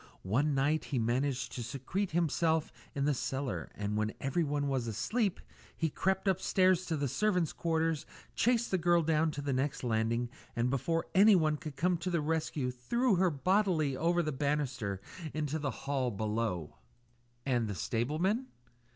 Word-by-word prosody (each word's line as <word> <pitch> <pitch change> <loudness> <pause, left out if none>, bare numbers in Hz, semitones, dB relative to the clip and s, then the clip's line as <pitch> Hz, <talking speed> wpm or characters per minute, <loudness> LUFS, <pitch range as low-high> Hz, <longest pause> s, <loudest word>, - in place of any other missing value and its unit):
One 135 +10 +1
night 145 +3 +1
he 140 - -2
managed 125 +3 0
to 120 - -4
secrete 140 - -3
himself 160 -1 +1 0.2
in 140 -1 0
the 150 - +3
cellar, 135 +1 -3
and 105 0 -2
when 110 +1 -1
everyone 145 0 0
was 130 -4 -1
asleep, 195 - 0 0.4
he 160 -2 0
crept 190 +5 0
upstairs 185 -1 +3
to 160 - -1
the 140 -1 0
servants' 180 - +1
quarters, 165 -2 0 0.3
chased 235 0 +2
the 185 - +2
girl 170 0 +3
down 160 0 +2
to 150 -2 -5
the 140 -1 -1
next 130 +2 -1
landing, 115 +1 0 0.2
and 120 +1 +1
before 165 +5 0
anyone 185 -6 +6
could 150 -1 -7
come 175 +4 +1
to 170 +2 -3
the 170 -2 +1
rescue 150 -4 -1
threw 200 - +1
her 185 0 +4
bodily 170 -2 +1
over 170 +4 +2
the 155 - -1
banisters 135 -7 -1 0.4
into 155 0 -1
the 145 -1 -1 0.2
hall 135 -3 0
below." 105 - -2 0.7
"And 120 -4 +1
the 100 - -3
stableman 155 - 0
150 Hz, 160 wpm, -32 LUFS, 125-170 Hz, 0.7 s, anyone